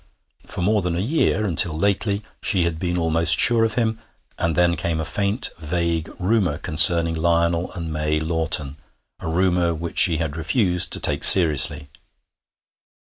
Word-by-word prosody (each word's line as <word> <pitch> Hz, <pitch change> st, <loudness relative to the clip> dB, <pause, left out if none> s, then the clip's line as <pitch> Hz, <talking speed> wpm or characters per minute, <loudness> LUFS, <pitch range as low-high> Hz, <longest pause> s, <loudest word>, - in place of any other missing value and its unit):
For 90 Hz, -, -7 dB
more 105 Hz, +2 st, -1 dB
than 90 Hz, -2 st, -5 dB
a -, -, -4 dB
year, 110 Hz, -, -2 dB
until 85 Hz, -3 st, 0 dB
lately, 100 Hz, +2 st, -3 dB, 0.2 s
she 95 Hz, -6 st, -1 dB
had 85 Hz, -1 st, -5 dB
been 90 Hz, 0 st, -4 dB
almost 80 Hz, 0 st, +1 dB
sure 115 Hz, -2 st, +2 dB
of 110 Hz, -1 st, -3 dB
him, 115 Hz, -2 st, -3 dB, 0.4 s
and 85 Hz, -1 st, -3 dB
then 90 Hz, -1 st, 0 dB
came 80 Hz, 0 st, -5 dB
a 80 Hz, -, -5 dB
faint 100 Hz, -, 0 dB
vague 85 Hz, 0 st, -4 dB
rumour 95 Hz, -5 st, -2 dB
concerning 80 Hz, +2 st, +5 dB
Lionel 85 Hz, +1 st, -2 dB
and 85 Hz, -3 st, -8 dB
May 75 Hz, 0 st, -3 dB
Lawton, 80 Hz, -3 st, 0 dB, 0.4 s
a -, -, -10 dB
rumour 85 Hz, 0 st, -2 dB
which 85 Hz, +1 st, -4 dB
she 85 Hz, -5 st, +4 dB
had 80 Hz, -2 st, -6 dB
refused 90 Hz, +1 st, -2 dB
to -, -, +1 dB
take -, -, -2 dB
seriously. 75 Hz, -4 st, +6 dB
85 Hz, 160 wpm, -19 LUFS, 80-95 Hz, 0.4 s, seriously